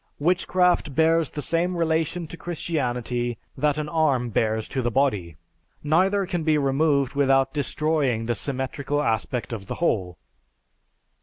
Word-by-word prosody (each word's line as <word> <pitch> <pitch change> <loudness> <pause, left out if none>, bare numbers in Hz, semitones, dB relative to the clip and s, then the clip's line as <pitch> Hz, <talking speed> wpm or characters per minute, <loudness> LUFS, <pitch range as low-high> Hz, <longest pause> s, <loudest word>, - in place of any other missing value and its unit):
Witchcraft 175 -2 +1
bears 160 -1 +3
the 150 - -5
same 175 +2 0
relation 165 +1 0
to 160 - -9
Christianity 125 -8 -2 0.2
that 150 -1 +1
an 150 -1 -2
arm 140 -7 +1
bears 110 +1 0
to 130 - -2
the 120 - 0
body; 105 - 0 0.5
neither 190 +6 +2
can 175 -2 -2
be 155 -1 +2
removed 140 -1 +1
without 135 -1 +2
destroying 145 -5 0
the 120 - 0
symmetrical 140 +3 -2
aspect 115 0 -1
of 100 -4 -6
the - - -4
whole. 95 - -1
145 Hz, 140 wpm, -24 LUFS, 125-160 Hz, 0.5 s, bears